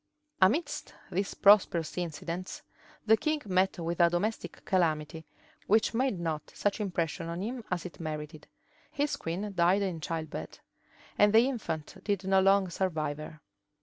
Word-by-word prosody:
{1503.} 185 - +8
Amidst 295 - -4
these 195 +3 -1
prosperous 195 -5 +5
incidents, 175 +1 -5 0.4
the 220 0 +6
king 305 +6 -1
met 190 0 +1
with 170 0 -3
a 170 -1 +6
domestic 200 +6 -3
calamity, 160 -4 0 0.4
which 220 +3 +3
made 245 -5 0
not 160 -3 -3
such 205 +2 0
impression 170 -5 -2
on 170 +3 -4
him 240 +2 -4
as 180 -1 -2
it 180 - -9
merited: 155 -1 -6 0.4
his 290 +1 0
queen 195 +5 -4
died 180 +3 +3
in 175 -5 -3
childbed; 160 -1 -5 0.6
and 205 0 +5
the 230 +3 +6
infant 180 - -5
did 200 -2 -1
not 190 0 +3
long 195 0 +4
survive 160 -5 -2
her. 155 0 -9
185 Hz, 150 wpm, -30 LUFS, 165-205 Hz, 0.6 s, 1503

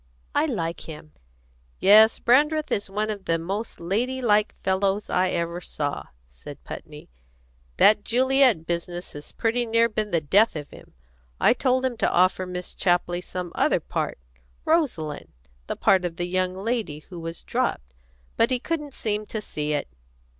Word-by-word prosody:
I - - +2
like 165 0 -3
him." 155 -1 -10 0.7
"Yes, 215 +3 +7
Brandreth 300 +5 +3
is 200 - -1
one 210 +2 -1
of 200 -2 -7
the 165 -1 +1
most 195 +7 -5
lady 230 +10 -1
like 215 -4 +2
fellows 195 +2 0
I 185 +1 +2
ever 170 0 -2
saw," 145 -4 -4 0.2
said - - -12
Putney. - - -10 0.7
"That 210 -1 +5
Juliet 255 -6 +3
business 175 +1 -3
has 145 0 -10
pretty 235 +2 0
near 230 +1 +4
been 215 -1 -2
the 170 - +2
death 195 +9 +3
of 145 -2 -6
him. - - -15 0.4
I - - +5
told 255 0 +1
him 250 -3 -2
to - - +1
offer 185 +1 +2
Miss 180 0 -5
Chapley 175 -1 +1
some 180 -1 -6
other - - +2
part - - -3 0.5
Rosaline, 240 - -1 0.3
the - - -3
part 190 -1 +3
of 175 -2 -3
the 175 0 -2
young 185 +1 -1
lady 205 -7 -3
who 175 - -7
was 165 0 -6
dropped; - - -2 0.4
but 230 - +4
he 255 -1 +1
couldn't 295 -1 -4
seem 210 -1 -2
to 220 - -4
see 150 -7 -3
it. 145 - -2
190 Hz, 165 wpm, -25 LUFS, 170-230 Hz, 0.7 s, Yes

